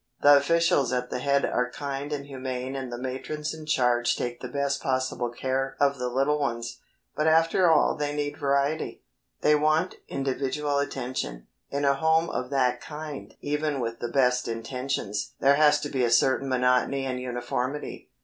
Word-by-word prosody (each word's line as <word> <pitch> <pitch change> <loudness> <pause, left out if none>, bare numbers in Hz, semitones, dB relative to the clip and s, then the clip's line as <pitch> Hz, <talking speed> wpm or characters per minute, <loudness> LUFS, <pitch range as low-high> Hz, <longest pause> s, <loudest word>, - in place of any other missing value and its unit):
The 145 0 +9
officials 145 -2 +3
at 125 0 -2
the - - -2
head 140 +1 +2
are 125 0 0
kind 140 +3 -5
and 140 -1 -3
humane 130 -1 -5
and 130 -2 -5
the 120 - -4
matrons 130 +5 -4
in 155 -1 -10
charge 125 -4 +2
take 120 0 -4
the - - -6
best 140 -1 -1
possible 130 -2 -1
care 135 +2 -2
of 140 -1 +2
the 125 0 -1
little 135 +4 +1
ones, 120 -4 -3 0.4
but 150 - +1
after 165 +3 +4
all 160 - +4
they 145 -1 -2
need 145 0 -2
variety. 140 +2 0 0.4
They 150 - +4
want 155 +4 +2
individual 140 +2 -1
attention. 125 - -3 0.2
In 140 +1 -1
a 140 - +5
home 160 +3 +2
of 125 - -3
that 125 -3 +1
kind 150 -2 -8
even 150 -1 -1
with 115 -1 -3
the 120 - -3
best 125 -1 +2
intentions 115 -2 -3
there 140 +1 +5
has 150 -1 +5
to 145 - -3
be 130 -3 0
a 120 - +3
certain 130 +3 +3
monotony 125 +1 +2
and 130 -1 -2
uniformity. 125 +2 -4
135 Hz, 175 wpm, -26 LUFS, 125-145 Hz, 0.4 s, The